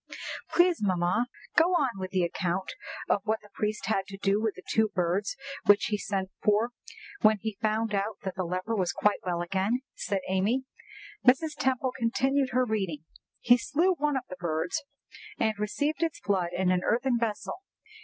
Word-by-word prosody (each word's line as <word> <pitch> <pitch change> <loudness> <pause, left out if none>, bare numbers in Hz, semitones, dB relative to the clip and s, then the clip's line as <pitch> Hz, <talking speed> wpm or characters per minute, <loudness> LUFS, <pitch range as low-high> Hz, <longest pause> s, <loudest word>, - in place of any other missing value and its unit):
"Please, 350 -4 +3
mamma, 185 +4 +1 0.3
go 350 +3 +5
on 260 - +1
with 185 0 -4
the 185 -1 +1
account 180 +2 -1 0.3
of 200 - +2
what 220 +1 0
the 210 -1 -18
priest 215 0 -2
had 195 -3 0
to 195 - -8
do 200 +1 +1
with 220 -2 0
the 185 - -11
two 220 0 +3
birds 190 0 -1 0.3
which 205 0 +6
he 210 - +1
sent 190 -2 -2
for 215 +3 +3 0.5
when 215 0 +6
he 215 -1 -5
found 220 0 +1
that 200 -1 -2
the 185 - -1
leper 185 +6 -2
was 185 -4 +1
quite 210 -1 +1
well 175 -1 -1
again," 195 +7 0
said 200 -1 -2
Amy. 200 +8 +1 0.6
Mrs. 285 +5 +4
Temple 265 -3 0
continued 265 +3 +1
her 255 0 +2
reading: 190 -9 -2 0.4
"'He 245 +1 +6
slew 340 +10 +2
one 295 -4 0
of 260 - -3
the 185 - -8
birds, 170 0 -1 0.6
and 220 -1 +2
received 290 +10 -1
its 330 -2 0
blood 185 -4 0
in 185 0 +1
an 180 -1 +2
earthen 240 +1 +2
vessel. 225 - -2
210 Hz, 175 wpm, -28 LUFS, 190-245 Hz, 0.6 s, which